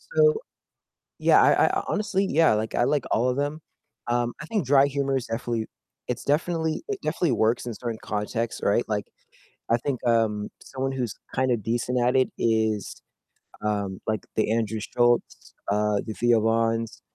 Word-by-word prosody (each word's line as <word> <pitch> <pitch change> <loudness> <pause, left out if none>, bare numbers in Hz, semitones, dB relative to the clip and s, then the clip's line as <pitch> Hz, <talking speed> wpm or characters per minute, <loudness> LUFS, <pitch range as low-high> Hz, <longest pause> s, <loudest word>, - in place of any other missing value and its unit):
So, 460 -1 +5 0.8
yeah, - - +5
I - - +5
I - - 0
honestly 205 -2 0
yeah, 155 -6 +4
like, 110 +1 -2
I 120 - +3
like 145 -2 +1
all 120 +3 +2
of 125 - 0
them, 145 +2 -2 0.5
um, 120 0 +1
I 155 - -7
think 205 - -1
dry 140 +1 +5
humor 140 -1 -1
is 130 - -2
definitely 115 -1 -2 0.4
it's - - -3
definitely 160 - 0
it 410 - -2
definitely 170 -7 0
works 115 +3 +1
in 120 - -4
certain 115 -1 -5
contexts, 110 +2 -3
right? 105 +4 +2
Like, 105 -1 -1 0.6
I 115 - +4
think, 130 +1 -3
um, 110 -3 +1
someone 135 0 -3
who's 125 -6 -2 0.2
kind 130 0 +2
of 110 -4 0
decent 120 +2 0
at 125 +2 +2
it 130 - +3
is, 110 -3 0 0.6
um, 100 -3 -2
like, 110 -1 -1
the 110 0 +1
Andrew 110 -1 0
Schultzs, 120 +2 0 0.2
uh, 105 0 +2
the 110 - -4
Theo 120 -1 +3
Vanns, 115 0 0
120 Hz, 170 wpm, -25 LUFS, 110-135 Hz, 0.8 s, So